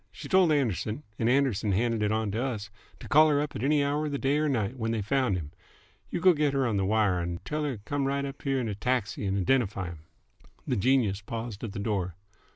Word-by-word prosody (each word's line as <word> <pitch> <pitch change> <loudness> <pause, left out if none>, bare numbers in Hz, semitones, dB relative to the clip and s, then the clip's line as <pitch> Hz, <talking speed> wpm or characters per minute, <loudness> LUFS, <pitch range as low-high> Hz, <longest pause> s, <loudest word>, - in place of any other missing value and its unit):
She - - -9
told 185 -3 +4
Anderson's 125 - 0 0.2
and 115 - +2
Anderson's 125 -7 +2
handed 115 +1 +1
it 105 0 +1
on 110 -1 0
to 110 +5 -1
us 105 -6 -4 0.3
to - - -8
call 155 +3 +6
her 145 -1 +3
up 150 0 -3
any 140 +5 +2
hour 145 +2 0
of - - -4
the 140 - -1
day 140 +2 +1
'r 155 0 +1
night 115 -3 -1
when 115 -3 -2
they 115 -2 -1
found 125 -3 +1
him. 75 -4 -6 0.6
You - - -2
go 180 +1 +6
get 150 -3 +1
her 135 -1 +1
on 110 -4 0
the 95 - +1
wire 105 -3 +2
and 85 0 -4
t'll 150 0 -2
her 140 -4 -2
t' 100 - -18
come 145 -1 -1
right 140 0 -1
up 135 - -7
here'n 135 -4 0
a 105 - -2
taxi 105 -2 -1
and 95 +1 0
identify 100 -3 +1
him." 85 -2 -9 0.7
The 125 - 0
genius 115 -3 +2
paused 115 0 -6
at 110 -4 -4
the - - -6
door. 95 -5 -2
120 Hz, 245 wpm, -28 LUFS, 100-140 Hz, 0.7 s, call